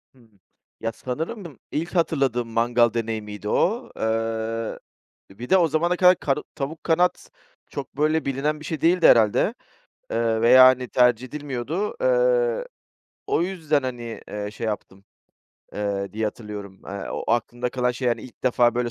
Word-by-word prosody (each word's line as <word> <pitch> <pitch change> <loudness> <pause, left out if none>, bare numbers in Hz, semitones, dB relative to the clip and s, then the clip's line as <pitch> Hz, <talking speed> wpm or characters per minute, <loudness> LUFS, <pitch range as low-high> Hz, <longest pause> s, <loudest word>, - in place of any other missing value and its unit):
Hı - - -22
hı. 115 - -21 0.5
Ya, 115 - -2
sanırım 160 - -6
ilk 170 +4 -3
hatırladığım 135 -8 +1
mangal 120 0 +2
deneyimiydi 105 -2 -4
o. 230 +7 +1
Eee, 115 0 -2 0.5
bir 120 +6 -9
de 190 - +6
o 170 -3 +4
zamana 170 +4 +1
kadar 180 0 +6
kar 135 -1 0 0.2
tavuk 150 +4 -5
kanat 175 +2 +1 0.4
çok, 135 -1 -7
böyle, 155 +2 +1
bilinen 145 +3 -1
bir 150 - -10
şey 155 0 -4
değildi 175 +2 +5
herhâlde, 110 -3 +4 0.6
eee, 115 -1 0
veya, 130 +2 +8
hani, 130 -1 +3
tercih 125 0 +3
edilmiyordu. 145 - -4
Eee, - - +2 0.6
o - - +1
yüzden, 165 -6 0
hani, 120 -3 -5
eee, 105 0 -4
şey 110 +2 -5
yaptım, 100 -2 -5 0.7
eee, 100 -1 -3
diye 110 +1 -2
hatırlıyorum. 105 -3 -6
Eee, 100 0 -6
o - - -4
aklımda 120 +1 -1
kalan 125 -1 0
şey, 125 +1 -2
hani, 120 -2 -1
ilk 130 - -14
defa, 120 -1 +3
böyle, 120 -1 -1
125 Hz, 155 wpm, -24 LUFS, 115-160 Hz, 0.7 s, veya